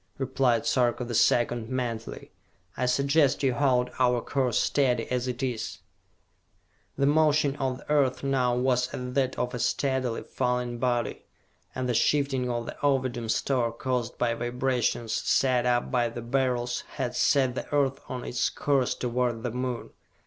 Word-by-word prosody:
replied 130 -3 +1
Sarka 125 -1 +1
the 120 - -5
Second, 115 0 +2
mentally. 120 -3 -4 0.4
"I 125 - -1
suggest 140 +2 +2
you 130 -2 +3
hold 125 -2 +2
our 125 -1 +3
course 125 -2 0
steady 125 -5 +1
as 125 0 0
it 125 0 -3
is!" 120 -4 -3 1.2
The 140 - +2
motion 150 -1 +3
of 130 -2 -1
the 145 - -9
earth 140 -3 +2
now 130 -3 +1
was 125 0 +1
as 125 0 -5
that 130 -1 0
of 125 0 -2
a 125 - -4
steadily 130 -2 0
falling 125 -1 -2
body, 120 -1 -1 0.5
and 130 -1 -2
the 125 - 0
shifting 135 0 +1
of 120 -1 -2
the - - -7
Ovidum 130 -5 0
store 120 0 +1
caused 125 0 -3
by 120 -1 +1
vibrations 120 -1 -1
set 125 0 +2
up 120 0 +1
by 120 -2 +2
the 120 0 -7
Beryls 125 -1 0
had 125 -3 -3
set 135 -3 +3
the - - -6
Earth 140 -2 +1
on 125 -1 -4
its 125 0 0
course 135 -3 0
toward 120 -2 -1
the 120 - -2
Moon. 125 0 -4
125 Hz, 160 wpm, -27 LUFS, 120-135 Hz, 1.2 s, you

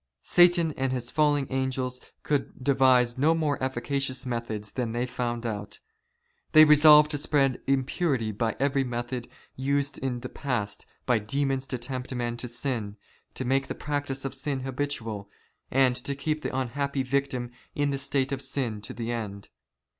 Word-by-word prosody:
Satan 175 -2 +5
and 135 0 0
his 125 -1 -3
fallen 145 -2 +3
angels 130 -1 -1 0.2
could 140 -3 -2
devise 130 -2 +4
no 160 +4 +4
more 150 -4 0
efficacious 130 0 -2
methods 115 -4 -3
than 120 -3 -2
they 120 +1 0
found 120 -1 -3
out. 105 -3 -4 0.8
They 155 0 +10
resolved 150 0 +8
to 145 - -1
spread 140 -3 +2
impurity 135 -3 +1
by 110 +2 -1
every 140 0 +2
method 120 0 -4 0.3
used 140 +1 -1
in 125 -2 -2
the 125 - -5
past 120 -7 -3 0.2
by 125 -3 +3
demons 135 +4 -1
to 130 - -2
tempt 125 +1 -5
men 120 -1 -2
to 125 - -5
sin, 120 -4 -3 0.4
to 130 - -3
make 135 +2 +1
the - - -4
practice 145 -2 -3
of 135 - -3
sin 135 0 -3
habitual, 125 -6 -3 0.4
and 130 -1 +3
to 140 +2 -4
keep 155 +2 -2
the 130 - -3
unhappy 135 +2 -1
victim 130 -2 -1 0.2
in 145 -1 +1
the 140 - -2
state 135 -1 0
of 135 -1 -2
sin 130 -6 -2
to 105 - -8
the 115 0 -3
end. 105 -4 -5
130 Hz, 165 wpm, -27 LUFS, 120-140 Hz, 0.8 s, They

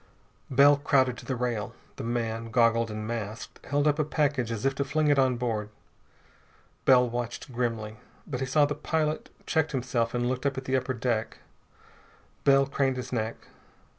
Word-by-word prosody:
Bell 140 +2 +6
crowded 135 -3 +2
to - - -12
the 130 - -1
rail. 115 -4 -2 0.2
The - - -5
man 115 -1 -2
goggled 115 -1 +3
and 110 0 -5
masked 110 -1 -6
held 145 +1 +1
up 150 +1 +2
a - - +4
package 145 -5 0
as 115 +1 -3
if 135 - +3
to 140 - -1
fling 150 +2 +1
it 145 -1 +4
on 130 -2 +3
board. 110 -4 -2 1.2
Bell 125 -2 +6
watched 120 +2 -5
grimly. 115 -3 -2 0.3
But 125 -4 -4
he 130 - -2
saw 145 +3 +4
that 145 - -2
the 145 - -13
pilot 155 -1 -1 0.2
checked 160 -1 0
himself 125 -3 -1
and 120 0 0
looked 130 +2 -1
up 140 - -2
at 130 - -5
the 130 - 0
upper 130 0 -1
deck. 115 -2 -1 1.1
Bell 135 0 +6
craned 135 -1 0
his 125 0 -6
neck. 110 -1 -1
125 Hz, 185 wpm, -28 LUFS, 115-140 Hz, 1.2 s, Bell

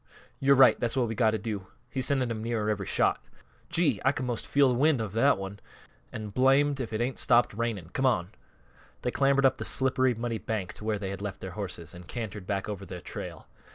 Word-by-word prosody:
"Yo're 140 0 +5
right; 130 -1 +6
that's 120 +2 -1
what 125 -2 +2
we've 115 - -4
got 110 -2 +3
to 110 - 0
do. 105 -2 -5 0.2
He's 130 +1 -2
sending 130 -4 +1
'em 110 -1 -3
nearer 110 -2 -1
every 100 -2 -3
shot - - +1 0.5
Gee! 165 - +2
I 130 - +4
could 130 -2 -4
'most 120 -2 -3
feel 140 -3 +4
th' - - -1
wind 145 +1 +3
of 110 -3 -4
that 135 +4 +4
one. 95 +1 -6 0.5
An' 110 -1 -6
blamed 135 +5 +3
if 120 -4 -4
it 110 +1 -2
ain't 125 +2 -1
stopped 120 -2 +4
raining. 105 -6 -3
Come 130 - +2
on." 95 -7 +1 0.7
They 125 - 0
clambered 140 0 +3
up 135 - +4
the - - -2
slippery, 130 -1 +2
muddy 115 0 -3
bank 105 -5 -3
to - - -12
where 110 -1 0
they 95 -1 -4
had 100 0 -6
left 100 -1 -5
their 95 - -6
horses, 90 -4 -6
and 90 -1 -11
cantered 105 -5 -6
back 100 -2 -2
over 100 -2 -5
their 90 -1 -7
trail. 85 - -8
115 Hz, 230 wpm, -28 LUFS, 100-130 Hz, 0.7 s, right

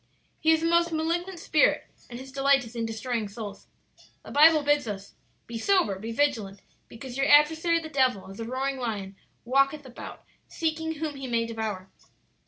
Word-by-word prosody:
"He 315 - +1
is 320 0 +2
a - - +1
most 340 0 +3
malignant 340 +3 -2
spirit, 310 -2 +2 0.3
and 240 - -7
his 265 +1 -10
delight 275 -1 +3
is 230 +1 -12
in 230 -1 -2
destroying 225 0 -3
souls. 205 0 -8 0.6
The - - -9
Bible 305 +1 +6
bids 290 -3 +2
us, 200 -2 -6 0.3
'Be 235 -1 -6
sober, 345 - +2
be 225 +3 -5
vigilant, 220 -7 -1 0.2
because 245 +2 -9
your 275 - +1
adversary 320 +3 +5
the 325 - -7
devil 260 -9 +1
as 195 +2 -11
a 225 - -4
roaring 265 +3 -2
lion 205 -6 -4 0.3
walketh 275 +3 +2
about, 250 -2 -10 0.2
seeking 320 0 -2
whom 300 -2 -4
he 270 -1 -6
may 230 -1 0
devour.' 220 -5 -5
270 Hz, 180 wpm, -27 LUFS, 225-315 Hz, 0.6 s, Bible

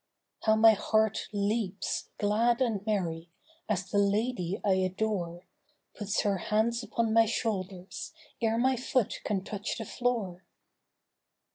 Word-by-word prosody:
How 220 0 +5
my 220 +1 +8
heart 220 0 +1
leaps 205 -1 -1
glad 225 +3 +2
and 225 -6 0
merry, 170 -5 -1 0.4
as 195 -3 0
the 205 - +3
lady 200 -2 0
I 200 - +4
adore 185 -2 -1 0.5
Puts 205 0 -1
her 200 -2 +1
hands 220 +5 +1
upon 225 0 -1
my 225 0 +5
shoulders 200 - -3 0.3
ere 225 0 +2
my 260 +2 +3
foot 250 -2 0
can 195 -3 -1
touch 205 0 -4
the 225 - -5
floor. 210 -7 -2
210 Hz, 130 wpm, -29 LUFS, 195-225 Hz, 0.5 s, my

